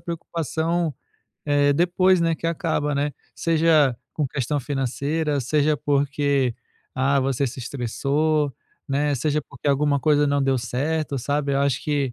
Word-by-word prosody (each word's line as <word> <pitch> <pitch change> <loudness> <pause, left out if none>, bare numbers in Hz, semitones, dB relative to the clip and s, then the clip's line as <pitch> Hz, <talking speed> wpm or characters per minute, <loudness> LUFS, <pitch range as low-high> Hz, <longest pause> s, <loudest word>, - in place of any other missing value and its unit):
preocupação, 165 -1 -2 0.5
eh, 145 -1 +3
depois, 180 +3 +3
né, 165 -1 +2
que 165 - -5
acaba, 160 -3 -1
né. 145 +1 0 0.2
Seja 160 -5 +3 0.2
com 150 - -1
questão 140 +2 -2
financeira, 145 +3 -1
seja 150 +4 +1
porque, 140 -3 +1 0.4
ah, 135 +1 +2
você 135 +1 0
se 130 +1 -7
estressou, 140 +4 0 0.4
né, 145 +1 +1
seja 150 +4 0
porque - - -4
alguma 140 0 +2
coisa 145 +1 +3
não 140 0 +1
deu 135 -1 +2
certo, 140 +4 -2
sabe. 145 +2 -1
Eu 135 - +1
acho 140 -2 0
que 145 -4 -1
145 Hz, 145 wpm, -23 LUFS, 135-155 Hz, 0.5 s, eh